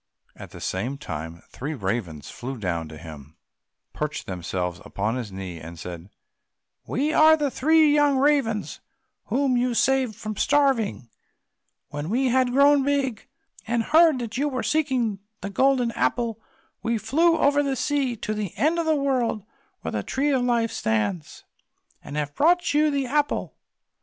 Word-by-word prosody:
At - - -10
the - - -11
same 120 +9 -3
time 80 - -7
three 150 +5 -5
ravens 95 - -4
flew 130 +2 -6
down 85 -6 -3
to 80 0 -10
him, 75 -2 -11 0.6
perched 150 0 -4
themselves 90 0 -4
upon 105 +3 -2
his 120 -5 -5
knee, 95 -3 -7
and 85 +2 -10
said, 85 +2 -8 0.8
"We 295 +5 0
are 315 0 +6
the 290 -3 -1
three 310 +2 +4
young 290 -2 +3
ravens 265 -7 +1 0.5
whom 270 -1 +1
you 245 0 0
saved 260 -3 +2
from 215 -1 -6
starving; 265 - +1 0.8
when 145 +2 -5
we 255 +4 +1
had 255 0 +2
grown 280 +2 +5
big, 270 -5 -1 0.4
and 235 0 +1
heard 315 +2 +5
that 235 -2 -5
you 290 +2 +1
were 255 -3 -3
seeking 260 -9 0 0.2
the 200 +2 -5
Golden 255 +2 +2
Apple, 230 -2 -1 0.4
we 230 0 0
flew 325 +10 +2
over 285 -1 +3
the 275 -2 -1
sea 275 -1 0
to 215 -1 -4
the 210 -4 -5
end 320 +3 +2
of 330 - -1
the 315 - +3
world, 255 -7 0 0.4
where - - -4
the - - -2
Tree 285 +2 -1
of 265 -2 +2
Life 235 -2 +1
stands, 105 -6 -2 0.6
and 145 - -7
have 145 -1 -2
brought 350 - +2
you 305 +1 +4
the 280 -2 0
apple." 290 +3 -1
235 Hz, 160 wpm, -24 LUFS, -, 0.8 s, are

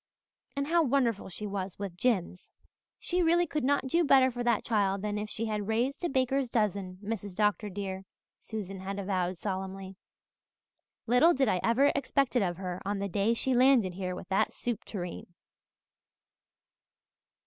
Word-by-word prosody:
And 280 0 -1
how 335 +3 +3
wonderful 250 -9 +1
she 210 +4 -6
was 195 -2 -4
with 195 -3 -5
Jims. 185 -4 -1 0.5
"She 360 0 0
really 345 +1 +4
could 300 -3 -3
not 280 +1 +2
do 335 +7 +2
better 265 -3 +5
for 245 0 -4
that 235 -3 +2
child 200 -3 +1
than 210 0 -1
if 210 0 -4
she 225 +2 -3
had 210 -2 -2
raised 240 +8 0
a 345 - +1
baker's 265 0 +1
dozen, 200 -5 -1
Mrs. 205 -3 -4
Dr. 210 +1 +1
dear," 190 -1 -5 0.3
Susan 195 -3 -6
had 195 +1 -5
avowed 185 -2 -1
solemnly. 190 0 -5 1.1
"Little 250 +9 +5
did 270 -1 +2
I 185 - +2
ever 260 +5 +4
expect 275 -1 0
it 245 - +4
of 175 -3 -1
her 185 -1 -5
on 205 +1 -2
the 200 0 -2
day 205 +5 +1
she 260 +3 0
landed 250 -7 +4
here 180 0 -4
with 180 - -9
that 190 - +1
soup 240 -3 -4
tureen." 175 -2 -6
210 Hz, 170 wpm, -30 LUFS, 190-255 Hz, 1.1 s, better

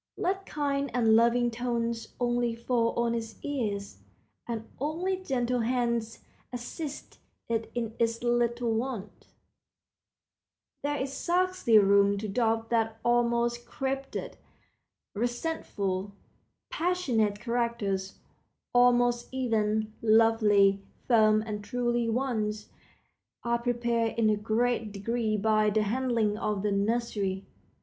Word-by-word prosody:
Let 385 +2 -1
kind 280 -2 -1
and 225 -3 +4
loving 235 +1 +3
tones 235 -1 -3
only 240 -1 0
fall 235 0 0
on 235 0 +1
its 225 -1 -4
ears, 210 -8 -3 0.5
and 225 -2 -4
only 330 +7 -1
gentle 250 -8 -1
hands 235 -1 -1 0.3
assist 275 +5 -7 0.3
it 225 -1 -2
in 230 -2 -2
its 230 0 0
little 240 -1 +1
wants. 225 -3 -4 1.5
There 290 0 -1
is 270 +1 -3
scarcely 360 -6 +2
room 200 0 +5
to 215 +2 -4
doubt 225 +1 0
that 225 -1 +1
all 240 0 +4
most 235 0 -1
crabbed, 270 +1 -3 1.0
resentful, 205 - -2 0.6
passionate 255 - 0
characters—all 235 +1 -1
most 240 0 +1
even, 220 -4 0
lovely, 215 -3 +4 0.3
firm, 215 -3 +4
and 210 -2 -5
true 240 +1 0
ones—are 230 0 -4
prepared 235 -2 0
in 220 -2 +3
a - - +3
great 225 +1 0
degree 215 +2 -1
by 215 0 +3
the 215 +1 +1
handling 225 -2 0
of 210 -3 -1
the 210 - +1
nursery. 200 -2 -1
235 Hz, 110 wpm, -28 LUFS, 215-245 Hz, 1.5 s, room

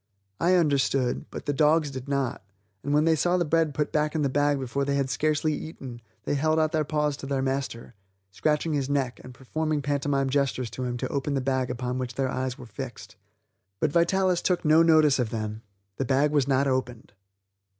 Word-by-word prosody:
I 180 +2 +3
understood, 140 -6 +1
but - - -8
the 145 - 0
dogs 150 +1 +3
did 130 +1 -7
not, 135 -5 -1 0.4
and 145 - -2
when 150 +2 +3
they 165 -1 +4
saw 175 +3 +2
the 175 - +1
bread 160 -2 +1
put 150 -1 -1
back 150 +1 0
in 155 - +1
the 140 - +1
bag 145 +1 +1
before 135 +2 -2
they 140 0 0
had 135 -1 0
scarcely 155 0 +1
eaten, 130 -7 -7 0.2
they - - -1
held 155 +3 +1
out 155 -1 +2
their 155 -2 +1
paws 150 -1 0
to 135 - -8
their 135 -1 -1
master, 135 -3 -3 0.4
scratching 150 - 0
his 140 -2 -1
neck, 135 -3 -1
and 125 - -10
performing 150 +3 -2
pantomime 140 -1 0
gestures 135 -4 0
to - - -7
make 125 -1 -3
him - - -2
open 140 +1 -1
the - - +1
bag 130 -1 -1
upon 125 +1 -3
which 125 -2 -4
their 135 -1 0
eyes 130 -1 -3
were 125 - -10
fixed. 120 +3 -8 0.6
But 155 - +1
Vitalis 180 +2 +2
took 180 -2 0
no 155 +2 +6
notice 155 -4 +5
of 120 -3 0
them; 110 -1 -4 0.4
the - - 0
bag 140 +3 +2
was 145 -3 +2
not 135 0 +2
opened. 130 -5 -2
140 Hz, 210 wpm, -26 LUFS, 130-155 Hz, 0.6 s, no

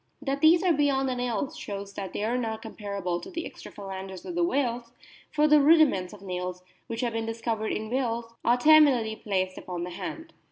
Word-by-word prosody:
That 280 -1 -2
these 335 +3 +6
are 360 -2 +4
beyond 280 -2 +2
the 260 - 0
nails 245 +4 -2
shows 200 -9 -6
that 195 -2 -5
they - - -3
are 230 +3 0
not 225 -3 -2
comparable 200 -5 -4
to - - -9
the 340 -2 -4
extra - - -10
phalanges 190 -2 -7
of 355 - -5
the 345 0 +1
whales; 245 -7 -1 0.4
for 300 0 +3
the 300 -1 +6
rudiments 285 - +4
of 205 -2 -12
nails, 180 -1 -4 0.2
which 230 -2 -4
have 240 -2 -1
been 225 0 -2
discovered 225 -1 -2
in 220 +1 -3
whales, 235 -3 -1
are 240 +1 +4
terminally 265 -6 +5
placed 185 -2 -1
upon 175 -2 -5
the 180 - -5
hand. 320 - -7
230 Hz, 205 wpm, -27 LUFS, 200-285 Hz, 0.4 s, these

